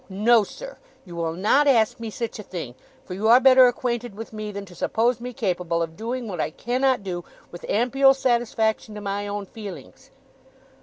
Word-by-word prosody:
No, 215 +4 +4
sir! - - -10 0.3
You 175 -2 -10
will 165 -1 -2
not 220 +11 +3
ask 245 -2 +3
me 230 -1 -5
sich 225 +1 -5
a - - -4
thing, 170 -11 -7 0.3
for - - -7
you 205 +4 -1
are 240 +2 +8
better 260 -1 +7
acquainted 240 -2 -2
with 225 +1 -9
me 215 -1 -5
than 200 0 -7
to 180 - -15
suppose 235 +7 0
me 250 +1 -5
capable 180 -6 -1
of 165 0 -7
doing 235 +4 -4
what 180 -6 -3
I - - -1
cannot 250 +5 0
do 175 -2 -4 0.3
with 175 - -10
ampial 270 +4 +4
satisfaction 230 -4 0
to 210 - -7
my 200 0 -3
own 205 0 -4
feelings! 205 -2 -10
220 Hz, 195 wpm, -24 LUFS, 195-245 Hz, 0.3 s, are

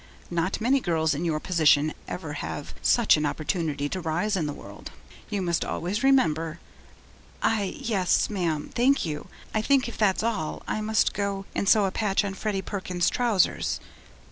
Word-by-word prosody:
Not 175 +2 0
many 255 +5 +3
girls 160 -7 +1
in 155 +5 -3
your 155 -2 0
position 155 -3 +3
ever 160 -5 -5
have 145 - -5
such 235 -8 +4
an 150 - 0
opportunity 155 -2 -2
to 185 - -3
rise 175 +6 0
in 165 -5 0
the - - -2
world. - - -10 0.4
You 200 -3 -1
must 170 -2 0
always 195 +6 -2
remember 165 - +2 0.4
' - - -21
'I 215 +4 0
yes, 210 -9 +1
ma'am, 170 -7 -2
thank 265 +1 +3
you. 150 -2 -4 0.3
I 215 - +1
think, 270 +2 +3
if 235 - -8
that's 210 -1 +2
all, 215 -9 -2
I 215 - -1
must 220 0 +2
go 200 -1 -2
and 200 - 0
sew 210 -2 +5
a 190 - -1
patch 205 -1 +1
on 195 - -3
Freddie 195 0 -2
Perkins's 185 -3 -1
trousers.' 230 -7 +1
190 Hz, 175 wpm, -26 LUFS, 160-215 Hz, 0.4 s, sew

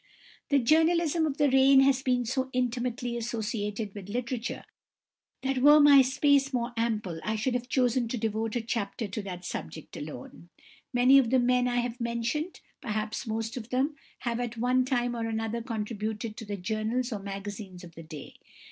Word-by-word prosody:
The 285 - +4
journalism 320 +4 +3
of 285 -1 -3
the 290 -3 +3
reign 270 0 +6
has 270 -1 +3
been 250 -2 +1
so 260 +2 -1
intimately 245 -1 -1
associated 220 -3 -3
with 200 -2 -9
literature 240 +2 -3 0.8
that 270 -1 0
were 295 +3 +7
my 290 -2 +8
space 275 +1 +3
more 240 -1 -2
ample 215 -7 -1
I 215 - -1
should 220 +4 -1
have 245 0 -3
chosen 250 -2 +2
to 245 - -3
devote 220 0 -2
a 240 - 0
chapter 225 0 -3
to 200 +2 -4
that 180 -3 -7
subject 155 - -7
alone. 150 +3 -9 0.4
Many 255 +2 +6
of 245 -4 +1
the 260 - +4
men 250 0 +3
I 245 0 +1
have 240 0 -5
mentioned, 235 +8 -2 0.2
perhaps 215 -1 -3
most 225 +1 -3
of 230 -1 -7
them, 270 +4 0 0.3
have 235 -1 -2
at 240 -1 -4
one 250 +2 +2
time 245 -2 0
or 230 -1 -2
another 225 +1 -2
contributed 220 -1 -4
to 225 - -7
the 205 -1 -4
journals 220 +5 -2
or 210 - -3
magazines 195 -1 -7
of 170 -1 -12
the 165 - -10
day. 155 -2 -10
235 Hz, 180 wpm, -28 LUFS, 215-255 Hz, 0.8 s, my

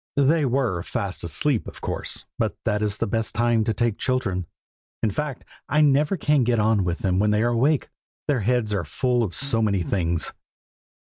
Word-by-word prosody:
They 145 +2 +3
were 125 -9 0
fast 95 +2 -4
asleep, 115 - 0
of - - -9
course, - - -2
but - - 0
that 105 0 +1
is 105 -1 0
the - - 0
best 115 +2 -2
time 120 -1 +2
to 110 - +1
take 115 0 0
children. 100 -9 -1 0.6
In 110 - +2
fact, 145 +3 -4 0.2
I 150 +2 +3
never 150 +5 +3
can 150 -4 +2
get 120 0 +2
on 110 -2 +3
with 85 -1 -1
them 95 -1 +2
when 105 +1 +3
they 105 +1 +2
are 120 - +2
awake, 135 +5 +2 0.4
their 145 -4 +2
heads 110 0 +1
are 100 -4 0
full 125 - 0
of 95 -7 -2
so 130 -3 +1
many 100 -4 +1
things. 85 -2 -1
115 Hz, 195 wpm, -24 LUFS, 100-130 Hz, 0.6 s, They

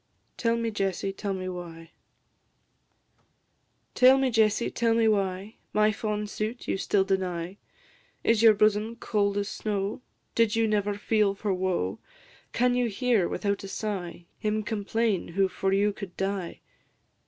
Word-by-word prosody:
TELL 230 0 +1
ME, 230 -1 -1
JESSIE, 195 -1 -2
TELL 200 0 -3
ME 185 0 -5
WHY? 170 -2 -8 2.0
Tell 255 +1 +6
me, 265 -1 +1
Jessie, 220 0 +2
tell 230 -1 +1
me 230 -1 +3
why 195 0 -1 0.2
My 215 0 +4
fond 210 0 -3
suit 215 +3 -4
you - - 0
still 195 0 +1
deny? 185 -1 -2 0.7
Is 230 -1 +3
your 225 -2 +7
bosom 215 +2 +2
cold 205 -3 0
as 200 0 -1
snow? 205 0 -3 0.3
Did 230 -1 +2
you 225 0 +2
never 205 -1 0
feel 205 -1 +1
for 200 0 -1
woe? 180 - -1 0.5
Can 250 +1 +2
you 245 -1 +1
hear, 225 -3 +1
without 200 -1 -2
a - - -6
sigh, 185 -5 -5
Him 215 0 -1
complain 215 -1 -1
who 195 +3 +1
for 190 +1 -2
you 200 +1 +2
could 195 -3 -9
die? 195 -2 -3
205 Hz, 150 wpm, -27 LUFS, 195-220 Hz, 2.0 s, your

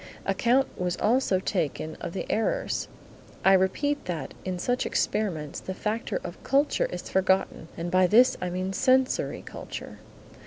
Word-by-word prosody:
Account 255 +3 +2
was 180 -1 -1
also 230 -3 +2
taken 160 -4 -2
of - - -5
the - - -3
errors. 365 - 0 0.6
I 195 - +7
repeat 285 +10 +1
that 165 -7 -4
in 185 -1 -3
such 245 +7 0
experiments 175 -9 -1
the 190 - -6
factor 225 - -2
of - - -8
culture 280 +2 +2
is 180 - -6
forgotten 190 -3 +1
and 170 +1 -3
by 185 0 +5
this 245 +6 +6
I 180 - -1
mean 185 +2 -3
sensory 260 +4 +2
culture. - - -8
190 Hz, 150 wpm, -27 LUFS, 180-250 Hz, 0.6 s, I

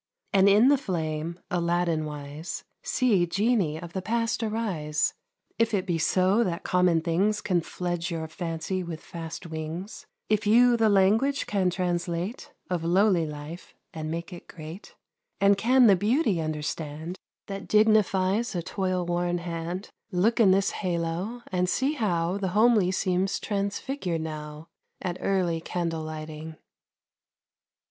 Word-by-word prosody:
And 195 0 +6
in 215 +6 +6
the 285 -1 +4
flame, 165 - -3
Alladin 170 -2 +1
wise, 150 +2 -6 0.2
See 205 -9 +2
genii 195 -5 +1
of 170 -1 -9
the 190 - -2
past 230 +2 -1
arise. 200 -10 -1 0.5
If 230 -1 +2
it 185 - -1
be 170 -2 -1
so 185 +7 +3
that 180 -3 -3
common 180 -3 +3
things 190 +6 +1
Can 185 -4 +1
fledge 175 0 -3
your 165 -2 -3
fancy 165 +3 -3
with 170 -3 -6
fast 165 +1 -8
wings; 160 +5 -6 0.2
If 215 0 +1
you 240 +3 +6
the 225 -2 +3
language 215 +8 +3
can 195 -3 +1
translate 175 +3 -2 0.2
Of 175 -3 -2
lowly 180 -1 +3
life, 150 +3 -9 0.2
and 155 -1 -5
make 170 +3 -4
it 175 - -11
great, 160 +4 -10 0.4
And 200 0 +5
can 245 +5 +4
the 200 -4 +7
beauty 210 - +1
understand 155 +2 -4 0.3
That 195 0 -6
dignifies 215 0 +3
a 170 - -1
toil 185 -1 -1
worn 175 0 0
hand, 170 +2 -5 0.2
Look 205 +7 +2
in 215 -4 +6
this 195 +1 +3
halo, 180 +6 -3
and 180 -1 +1
see 270 +8 +1
how 185 - 0
The 195 - -1
homely 220 -5 +5
seems 190 0 0
transfigured 200 - -2
now 155 0 -7 0.3
At 180 -2 -4
early 180 -4 +1
candle 165 -1 -2
lighting. 155 0 -7
180 Hz, 140 wpm, -27 LUFS, 165-205 Hz, 0.5 s, the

